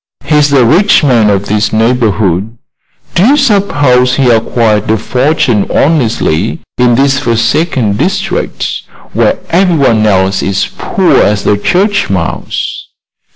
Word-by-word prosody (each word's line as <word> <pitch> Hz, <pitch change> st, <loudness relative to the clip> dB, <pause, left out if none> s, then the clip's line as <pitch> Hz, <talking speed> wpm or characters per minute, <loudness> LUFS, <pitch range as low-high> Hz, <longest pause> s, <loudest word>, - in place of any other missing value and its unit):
He 150 Hz, -, -2 dB
is 150 Hz, -1 st, +3 dB
the 135 Hz, -4 st, +3 dB
rich 180 Hz, -, +3 dB
man 120 Hz, -7 st, +2 dB
of 100 Hz, 0 st, 0 dB
this 105 Hz, +1 st, -1 dB
neighborhood. 110 Hz, -3 st, 0 dB, 0.6 s
Do 175 Hz, -, +1 dB
you 275 Hz, +7 st, +3 dB
suppose 145 Hz, -, +1 dB
he 130 Hz, -3 st, +2 dB
acquired 110 Hz, -2 st, 0 dB
a 110 Hz, -, +2 dB
fortune 125 Hz, -1 st, 0 dB
honestly 120 Hz, -, 0 dB, 0.2 s
in 125 Hz, -1 st, +3 dB
this 135 Hz, +1 st, +1 dB
forsaken 115 Hz, -, -1 dB
district, 190 Hz, -, -3 dB, 0.3 s
where -, -, +1 dB
everyone 155 Hz, -, +2 dB
else 95 Hz, -1 st, +1 dB
is 100 Hz, 0 st, -1 dB
poor -, -, 0 dB
as 105 Hz, -1 st, +1 dB
a 105 Hz, -, +2 dB
church 195 Hz, -, 0 dB
mouse?" 90 Hz, -4 st, -4 dB
120 Hz, 130 wpm, -10 LUFS, 105-150 Hz, 0.6 s, is